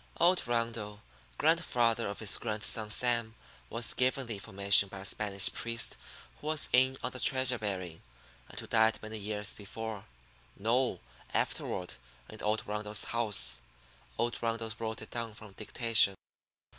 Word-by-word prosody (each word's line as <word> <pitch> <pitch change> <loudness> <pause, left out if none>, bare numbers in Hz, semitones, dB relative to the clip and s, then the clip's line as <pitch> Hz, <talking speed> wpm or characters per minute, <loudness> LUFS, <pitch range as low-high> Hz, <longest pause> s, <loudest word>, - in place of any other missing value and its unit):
Old 175 -4 +4
Rundle 115 -3 -2 0.3
grandfather 125 -8 +2
of 100 - -5
his 110 -3 +1
grandson, 110 -1 -1
Sam 115 -1 +1 0.3
was 115 0 +2
given 130 +1 +2
the 115 - -4
information 100 0 +3
by 100 - -9
a - - -7
Spanish 100 -1 +3
priest 115 0 0 0.4
who 150 - -9
was 155 -1 +2
in 130 +1 +5
on 125 - -1
the 130 - -7
treasure 130 -1 +2
burying, 95 -5 -4 0.5
and - - -7
who - - -6
died 110 0 +3
many 110 0 -5
years 105 0 -3
before 110 0 -7 0.5
no, 115 -1 +1 0.3
afterward 90 -1 -1 0.4
in 110 - -10
old 110 +1 0
Rundle's 105 0 -1
house. 105 - 0 0.6
Old 120 0 -1
Rundle 115 -1 -2
wrote 110 -1 -4
it - - -12
down 115 -2 -5
from 105 -1 -11
dictation. 110 -1 +2
110 Hz, 145 wpm, -31 LUFS, 105-120 Hz, 0.6 s, in